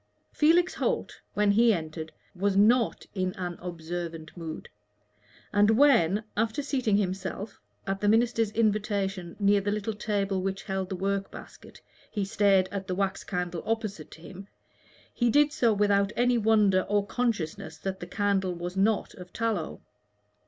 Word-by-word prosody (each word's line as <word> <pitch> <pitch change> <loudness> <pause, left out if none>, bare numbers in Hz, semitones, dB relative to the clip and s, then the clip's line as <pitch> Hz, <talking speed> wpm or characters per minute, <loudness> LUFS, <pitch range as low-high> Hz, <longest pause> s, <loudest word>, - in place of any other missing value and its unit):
Felix 335 +4 +3
Holt, - - -2
when 210 0 +3
he 230 +3 +5
entered, 160 -3 -4 0.2
was 195 +1 0
not 230 +3 +3
in 185 -2 -1
an 180 -2 -5
observant 170 -2 -6
mood; 165 -3 -7 0.9
and 205 +1 +4
when, 220 - +4
after 225 +6 0
seating 255 -7 +1
himself, 195 +1 -3 0.3
at 195 0 -3
the 205 - +1
minister's 225 0 +2
invitation, 200 -5 -1
near 200 0 +3
the 200 - -2
little 210 +1 -2
table 200 -2 -1
which 195 +1 -3
held 190 -2 -3
the 190 - -3
work 195 +1 -1
basket, - - -13 0.3
he 205 -3 -2
stared 195 -1 +3
at 195 -1 -5
the 185 - -2
wax 195 0 -1
candle 180 -2 -3
opposite 215 -8 -3
to 160 - -14
him, 195 +3 -10 0.7
he 240 -1 +1
did 295 +4 +4
so 235 -2 +3
without 200 -1 +2
any 245 +1 +3
wonder 210 -3 +4
or 205 -1 +2
consciousness 200 -6 -2
that 190 -1 -4
the 175 - -7
candle 195 -1 0
was 175 +1 -5
not 200 +1 +1
of 180 -1 -12
tallow. 220 -8 -2
200 Hz, 155 wpm, -28 LUFS, 185-220 Hz, 0.9 s, he